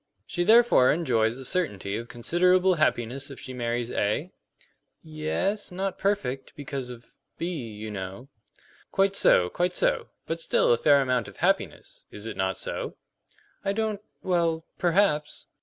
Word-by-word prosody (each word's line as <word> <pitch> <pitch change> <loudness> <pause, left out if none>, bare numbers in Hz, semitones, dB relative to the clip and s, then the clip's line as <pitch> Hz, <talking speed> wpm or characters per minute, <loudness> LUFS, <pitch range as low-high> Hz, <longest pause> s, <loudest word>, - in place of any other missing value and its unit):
"She 175 - -1
therefore 220 - +6
enjoys 120 -8 +1
a 135 - -7
certainty 105 - -1
of 115 - -5
considerable 180 +10 +3
happiness 140 -3 0
if 140 - -9
she 130 - -8
marries 120 -1 -2
A?" 110 - -1 0.7
"Ye 155 -1 -6
es; 205 0 -1
not 190 +1 -3
perfect, 135 -10 -1
because 140 -3 -5
of 120 -1 -11 0.2
B, 160 -10 -4
you 105 +1 -6
know." 95 +5 -6 0.6
"Quite 195 0 +2
so, 90 - +5
quite 175 - -1
so; - - +1 0.2
but - - -3
still - - +3
a - - +2
fair 140 -1 +5
amount 125 -3 0
of - - -12
happiness. - - -1
Is 105 +1 -7
it 115 - -5
not 95 0 -1
so?" - - -3 0.7
"I 195 - 0
don't 215 -1 -1 0.2
well, 170 -3 +1
perhaps." 175 -4 +1
150 Hz, 155 wpm, -26 LUFS, 120-185 Hz, 0.7 s, therefore